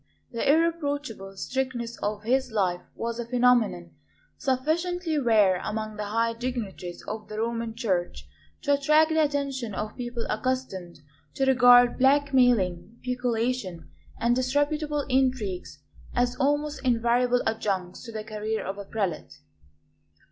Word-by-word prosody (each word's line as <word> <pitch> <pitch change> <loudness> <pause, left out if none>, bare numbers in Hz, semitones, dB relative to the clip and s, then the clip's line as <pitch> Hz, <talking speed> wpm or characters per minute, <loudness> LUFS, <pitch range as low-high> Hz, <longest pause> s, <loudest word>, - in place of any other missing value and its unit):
The 235 +4 +2
irreproachable 290 -11 -1
strictness 250 0 -3
of 210 0 -3
his 260 +2 +1
life 185 -5 0
was 235 0 -4
a 235 - -4
phenomenon 240 - +2 0.4
sufficiently 320 +5 0
rare 210 -7 +3
among 215 0 -3
the 210 -1 -4
high 230 +2 0
dignitaries 230 -7 -5
of 215 -1 -6
the 215 - -7
Roman 230 0 -2
Church 190 -7 -2 0.4
to 285 -1 +3
attract 305 +3 +4
the 315 0 +2
attention 275 -7 -1
of 215 +2 -4
people 240 -2 -4
accustomed 195 - -3 0.3
to 270 - +1
regard 245 -2 +6
blackmailing, 245 -9 +3
peculation, 245 -7 -2 0.3
and 235 +1 +2
disreputable 290 +3 0
intrigues 240 - -1 0.3
as 245 0 +1
almost 290 +1 0
invariable 245 0 +2
adjuncts 195 -5 -2
to 230 - -8
the 215 -1 -5
career 215 0 -3
of 195 +1 -5
a 200 - -6
prelate. 195 -5 -3
240 Hz, 125 wpm, -26 LUFS, 215-265 Hz, 0.4 s, regard